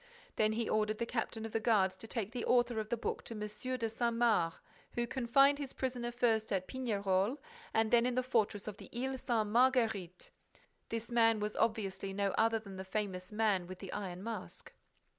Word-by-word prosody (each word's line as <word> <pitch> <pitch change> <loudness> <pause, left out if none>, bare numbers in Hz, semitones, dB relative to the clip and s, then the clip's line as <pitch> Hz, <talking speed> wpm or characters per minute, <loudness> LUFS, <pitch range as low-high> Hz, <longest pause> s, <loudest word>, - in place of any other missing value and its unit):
Then 215 0 +3
he 230 0 -1
ordered 215 0 +1
the 235 - -1
captain 225 -1 -3
of 225 - -6
the 225 - 0
guards 205 -5 +3
to 225 - -9
take 220 -3 -3
the 240 -1 -4
author 240 -2 +3
of 215 0 -4
the 235 - 0
book 230 - -3
to 230 - -6
M. 210 +5 -4
de 230 -2 -1
Saint 235 +1 -1
Mars, 220 -8 +3 0.4
who 240 - 0
confined 275 +4 +4
his 275 -2 -5
prisoner 245 -2 -2
first 230 -3 +1
at 185 -2 0
Pignerol 205 -2 0 0.3
and 220 0 +2
then 240 0 +5
in 250 - -1
the 255 - +1
fortress 220 -5 0
of 210 -2 -5
the 200 - -12
Ile 265 +1 -2
Sainte 225 -5 0
Marguerite. 225 -7 +2 0.6
This 230 +1 -4
man 225 -2 +4
was 210 0 -2
obviously 195 -4 -1
no 200 0 0
other 225 0 +3
than 200 -3 -9
the 190 - -5
famous 190 -1 -3
Man 210 -4 +1
with 185 0 -7
the 195 0 -8
Iron 190 -3 -5
Mask. 220 -3 -6
220 Hz, 200 wpm, -34 LUFS, 205-240 Hz, 0.6 s, then